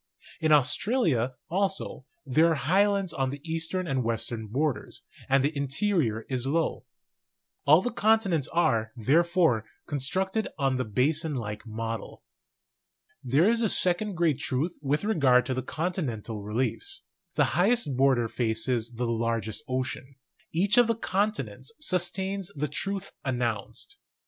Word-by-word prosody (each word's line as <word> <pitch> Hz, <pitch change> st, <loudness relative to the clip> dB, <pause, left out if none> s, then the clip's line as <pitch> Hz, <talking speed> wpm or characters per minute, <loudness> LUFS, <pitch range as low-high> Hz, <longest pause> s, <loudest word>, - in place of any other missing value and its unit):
In 155 Hz, -1 st, +1 dB
Australia, 145 Hz, -, +2 dB
also, 190 Hz, -6 st, -2 dB, 0.2 s
there 155 Hz, +5 st, +4 dB
are -, -, +2 dB
highlands 195 Hz, +4 st, +2 dB
on 135 Hz, -3 st, 0 dB
the 140 Hz, +2 st, -6 dB
eastern 165 Hz, +3 st, -1 dB
and 135 Hz, -5 st, 0 dB
western 115 Hz, -1 st, -3 dB
borders, 130 Hz, 0 st, -2 dB, 0.3 s
and 135 Hz, 0 st, +4 dB
the 150 Hz, +2 st, 0 dB
interior 140 Hz, -, 0 dB
is 130 Hz, -1 st, -2 dB
low. 160 Hz, +4 st, 0 dB, 0.8 s
All 155 Hz, +6 st, +6 dB
the 245 Hz, -, -1 dB
continents 210 Hz, -, +2 dB
are, 115 Hz, -10 st, +1 dB
therefore, 160 Hz, -, +3 dB, 0.2 s
con 145 Hz, -, -3 dB
structed 190 Hz, -, 0 dB
on 135 Hz, -3 st, +1 dB
the 130 Hz, -, -1 dB
basin 150 Hz, -, +1 dB
like 105 Hz, -2 st, -5 dB
model. 115 Hz, 0 st, -5 dB, 1.0 s
There 135 Hz, +8 st, +3 dB
is 230 Hz, +1 st, +3 dB
a 220 Hz, -, +2 dB
second 185 Hz, +3 st, +3 dB
great 160 Hz, -5 st, +1 dB
truth 145 Hz, +6 st, -2 dB
with 145 Hz, +3 st, 0 dB
regard 140 Hz, -12 st, +4 dB
to 130 Hz, -, -1 dB
the 130 Hz, -, -2 dB
con 165 Hz, +7 st, -2 dB
tinental 115 Hz, -, -4 dB
reliefs: 130 Hz, -, -2 dB, 0.3 s
the -, -, +4 dB
highest 195 Hz, -, +2 dB
border 130 Hz, -3 st, +3 dB
faces 115 Hz, +1 st, -1 dB
the 120 Hz, +2 st, -1 dB
largest 115 Hz, +1 st, -1 dB
ocean. 130 Hz, +1 st, -3 dB, 0.4 s
Each 200 Hz, +7 st, +3 dB
of 240 Hz, -, +5 dB
the 230 Hz, -, +1 dB
continents 190 Hz, -, -2 dB
sustains 190 Hz, -, -1 dB
the 150 Hz, +1 st, -1 dB
truth 195 Hz, +5 st, -4 dB
announced. 120 Hz, -6 st, -3 dB
140 Hz, 140 wpm, -27 LUFS, 125-185 Hz, 1.0 s, All